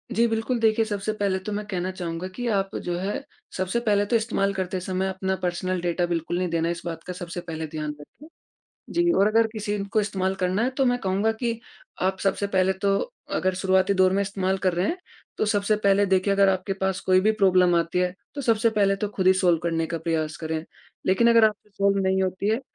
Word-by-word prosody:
जी। 235 - +4
बिल्कुल, 225 +2 -1
देखिए 225 0 +3
सबसे 210 0 -2
पहले 200 -3 0
तो 190 +3 -6
मैं 210 +1 -3
कहना 185 -2 -2
चाहूँगा 175 -1 -5
कि 245 -1 -3
आप 195 0 -4
जो 175 -1 -1
है 200 +8 -3 0.3
सबसे 185 +5 0
पहले 205 -3 +2
तो 220 - 0
इस्तेमाल 215 -3 +1
करते 185 -1 -2
समय 185 +1 -2
अपना 190 0 -2
पर्सनल 180 +1 -1
डाटा 175 0 0
बिल्कुल 175 0 -2
नहीं 185 - 0
देना 165 0 0
इस 170 0 -3
बात 165 -1 -5
का 180 - -4
सबसे 175 0 -6
पहले 160 -2 -5
ध्यान 155 -1 -4
रखें, 260 - -14 0.6
जी। 345 0 +2
और 195 - +4
अगर 225 +1 +4
किसी 210 -2 -3 0.2
को 215 - +3
इस्तेमाल 190 -2 -1
करना 185 +4 +1
है 255 - +1
तो 270 - +4
मैं 245 0 +2
कहूँगा 195 +2 0
कि 235 -2 -1 0.4
आप 190 +1 +1
सबसे 200 +1 0
पहले 190 -1 +2
तो 195 +1 0 0.4
अगर 185 0 +1
शुरुआती 190 +1 +2
दौर 185 0 +4
में 200 - +2
इस्तेमाल 190 -1 -1
कर 185 -1 +1
रहे 175 +3 0
हैं, 350 - -2 0.4
तो - - +2
सबसे 210 0 +1
पहले 200 -1 +3
देखिए 190 +1 +2
अगर 195 0 +4
आपके 190 +1 0
पास 190 -1 -1
कोई 185 0 +3
भी 215 +3 +3
प्रॉब्लम 180 -2 +5
आती 170 +1 0
है 180 0 0 0.2
तो 290 - -4
सबसे 230 -3 +2
पहले 200 -2 +2
तो 205 +1 -2
ख़ुद 185 - 0
ही 185 - +8
सॉल्व 180 -3 +3
करने 165 -1 0
का 165 +1 -3
प्रयास 160 -1 -2
करें। 160 0 -4 0.4
लेकिन 210 +5 +4
अगर 230 -1 +6
आपसे 210 -1 -1
सॉल्व 200 0 +1
नहीं 190 0 +2
होती 185 +2 -1
है, 220 +3 +1
190 Hz, 225 wpm, -25 LUFS, 180-210 Hz, 0.6 s, ही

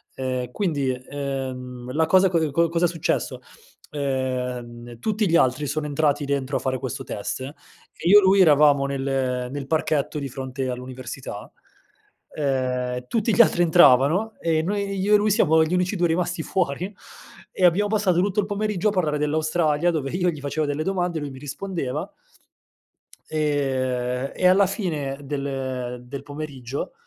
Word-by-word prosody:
Ehm, 130 -2 -3
quindi, 145 -9 -1
ehm, 125 -2 -5
la 160 +1 +2
cosa 190 +2 +5
cosa 165 -2 +1
ehm, 145 - -3 0.2
cosa 170 +1 +1
è - - +4
successo? 165 -2 -2 0.5
Ehm, 125 -4 -3
tutti 215 - 0
gli 170 - +3
altri 130 +1 +2
sono 150 +2 -2
entrati 145 0 +1
dentro 140 -1 -2
a - - -3
fare 130 -1 -2
questo 130 - -5
test 105 +5 -5
e 135 +3 -6 0.5
io 205 +2 +8
lui 195 +1 +4
eravamo 145 -3 +5
nel 135 -2 -1
nel 140 -1 -5
parchetto 155 -1 0
di 140 -1 -4
fronte 130 0 -4
all'università, 125 -3 -7 0.8
ehm, 125 -3 -1
tutti 225 -1 0
gli 235 - +8
altri 175 -5 +4
entravano 170 - +5
e 160 -1 +1
noi 200 +1 -2
io 205 +2 +4
e - - +8
lui 210 0 +1
siamo 160 -7 +4
gli 160 +3 -2
unici 180 +3 +1
2 175 0 +2
rimasti 170 0 -1
fuori, 180 +2 -2 0.6
e 185 - -1
abbiamo 190 +4 +4
passato 200 -5 +2
tutto 205 +2 +1
il 200 - -3
pomeriggio 210 -1 -1
a - - -4
parlare 155 -6 0
dell'Australia, 155 +2 +1
dove 145 -4 -2
io 180 0 +1
gli 150 -3 -8
facevo 145 +2 -2
delle 145 +2 -2
domande 180 -4 -1
lui 145 -1 -5
mi 130 - -10
rispondeva 155 +1 -4 1.2
ehm, 130 -4 -1
e 180 - +3
alla 190 +2 +5
fine 155 -9 -3
del 130 -3 -4
del 140 +1 -7
pomeriggio, 145 -3 -6
145 Hz, 160 wpm, -23 LUFS, 130-175 Hz, 1.2 s, io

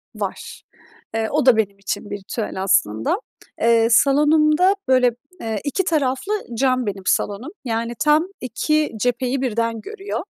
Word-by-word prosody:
Var. - - -6 0.5
Eee, 220 -1 0
o 300 -2 +1
da 255 -4 +6
benim 200 -2 -1
için 200 +1 -4
bir 205 - -4
ritüel 195 -1 -4
aslında. 110 - +1 0.4
Eee, 230 -1 +4
salonumda, 305 - +4
böyle, 255 -1 +4 0.3
eee, 220 -2 -2
iki 300 +6 -1
taraflı 305 +2 0 0.3
cam 255 -2 +2
benim 195 -2 -4
salonum. 205 +6 -1
Yani, 230 0 -2
tam 305 +3 +3
iki 300 +5 0
cepheyi 250 +2 0
birden 230 -2 -1
görüyor. 415 - -5
250 Hz, 140 wpm, -21 LUFS, 220-300 Hz, 0.5 s, da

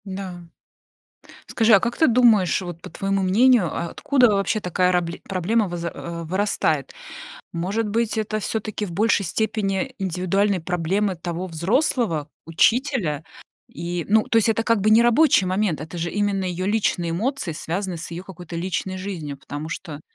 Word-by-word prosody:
Да. 190 -2 -6 1.1
Скажи, 225 -1 +2
а 200 - +8
как 240 +3 -2
ты 320 - +4
думаешь, 225 - +4
вот, 175 -2 -7
по - - -9
твоему 195 0 -1
мнению, 210 0 +4
а - - -2
откуда 260 -4 +3
вообще 200 +2 0
такая 180 0 +1
рабле 175 -1 -1
проблема 195 +3 0
вызр 170 -1 -4
э, 170 0 -6
вырастает? 200 - 0 0.6
Может 195 +6 -1
быть, 225 +1 0
это 215 0 -1
всё-таки 215 0 -3
в 175 - -8
большей 205 +2 +2
степени 215 - -1
индивидуальные 190 +1 0
проблемы 180 +4 -1
того 175 +2 -4
взрослого 175 - 0 0.2
учителя? 185 - +1 0.4
И, 170 0 -4
ну, 215 +1 +5
то - - 0
есть 225 0 +4
это 225 0 +2
как 230 -2 +2
бы 215 +2 +2
не 225 +2 +7
рабочий 240 -4 +4
момент, 185 -4 0
это 160 +3 -7
же 170 +1 -2
именно 205 -2 0
её 180 0 -3
личные 200 -5 0
эмоции, 220 +4 -2
связанные 175 +3 -4
с 165 - -7
её 170 +2 -5
какой-то 180 -3 -10
личной 185 +2 -3
жизнью. 170 -7 -5
Потому 145 +3 -7
что, 160 -2 -6
190 Hz, 165 wpm, -23 LUFS, 170-220 Hz, 1.1 s, а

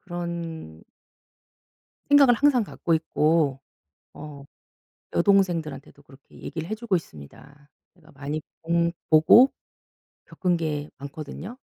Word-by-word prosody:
그런 170 - -7 1.3
생각을 280 -3 +7
항상 255 -1 +3
갖고 170 -3 -3
있고 155 -3 +1 0.6
어 145 -2 -10 0.7
여동생들한테도 165 -7 0
그렇게 140 0 -19
얘기를 165 0 -6
해 220 - -2
주고 220 -4 -1
있습니다. 145 - -9 0.3
제가 165 -2 -21
많이 145 +3 -5 0.2
본 170 +1 +1 0.2
보고 160 - +7 0.7
겪은 180 -2 -1
게 150 -2 -3
많거든요. 150 - -8
160 Hz, 235 characters per minute, -25 LUFS, 145-180 Hz, 1.3 s, 생각을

